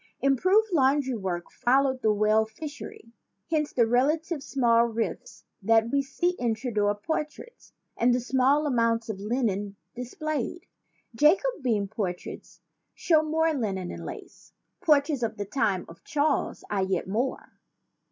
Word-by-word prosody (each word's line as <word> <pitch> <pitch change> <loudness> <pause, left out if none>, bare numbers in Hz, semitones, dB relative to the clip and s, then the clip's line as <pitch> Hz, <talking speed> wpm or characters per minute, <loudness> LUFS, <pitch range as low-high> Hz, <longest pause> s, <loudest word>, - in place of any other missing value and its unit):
Improved 370 - +3
laundry 270 -2 +3
work 185 -5 -4
followed 260 +1 +2
the 215 - +3
whale 215 +1 +3
fishery. 260 -1 -9 0.4
Hence 300 -2 +1
the 235 - +3
relatively 290 +7 +1
small 235 -4 +3
ruffs 230 0 -4 0.2
that 225 +3 +3
we 280 - +2
see 280 +6 -1
in 235 -2 +1
Tudor 210 -3 0
portraits 305 - -5 0.2
and 240 +1 +3
the 245 - +2
small 265 +4 +2
amount 230 -4 +1
of 205 -3 -4
linen 205 -2 -1 0.2
displayed. 290 +5 -4 0.5
Jacobean 295 - +2
portraits 185 -3 -6 0.3
show 315 -3 +3
more 320 +1 +1
linen 195 -9 -2
and - - -8
lace. - - -10 0.3
Portraits 290 -3 +3
of 225 -1 -2
the 205 - -3
time 200 -5 0
of 165 - -14
Charles 300 -1 0
I 200 -2 -1
yet 190 -1 -1
more. 235 +7 -3
245 Hz, 135 wpm, -27 LUFS, 220-295 Hz, 0.5 s, Improved